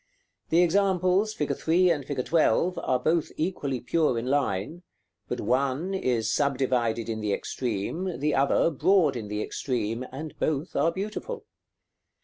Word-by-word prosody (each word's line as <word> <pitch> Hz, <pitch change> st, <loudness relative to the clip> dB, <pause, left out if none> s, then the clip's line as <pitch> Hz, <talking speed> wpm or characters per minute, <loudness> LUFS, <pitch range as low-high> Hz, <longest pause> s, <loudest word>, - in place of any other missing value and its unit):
The 170 Hz, +2 st, +5 dB
examples, 190 Hz, +2 st, +2 dB
fig. 150 Hz, -, -1 dB
3. 175 Hz, +2 st, +3 dB
and 150 Hz, -4 st, -1 dB
fig. 135 Hz, -2 st, -3 dB
12., 170 Hz, +2 st, +2 dB
are 130 Hz, -, +1 dB
both 160 Hz, +5 st, 0 dB
equally 150 Hz, -6 st, -2 dB
pure 125 Hz, +1 st, +1 dB
in 115 Hz, -, -2 dB
line; 140 Hz, -, -1 dB, 0.5 s
but -, -, -3 dB
one 140 Hz, +8 st, 0 dB
is 120 Hz, -, 0 dB
subdivided 125 Hz, -5 st, 0 dB
in 110 Hz, -1 st, -3 dB
the 105 Hz, -1 st, -1 dB
extreme, 125 Hz, -, -3 dB
the 150 Hz, +2 st, 0 dB
other 140 Hz, +4 st, +3 dB
broad 160 Hz, -1 st, +3 dB
in 110 Hz, -3 st, -5 dB
the 105 Hz, +1 st, -2 dB
extreme, 115 Hz, -2 st, -2 dB
and 150 Hz, +4 st, -6 dB
both 155 Hz, +2 st, -1 dB
are 165 Hz, -, +3 dB
beautiful. 225 Hz, -, -5 dB
145 Hz, 145 wpm, -27 LUFS, 125-175 Hz, 0.5 s, The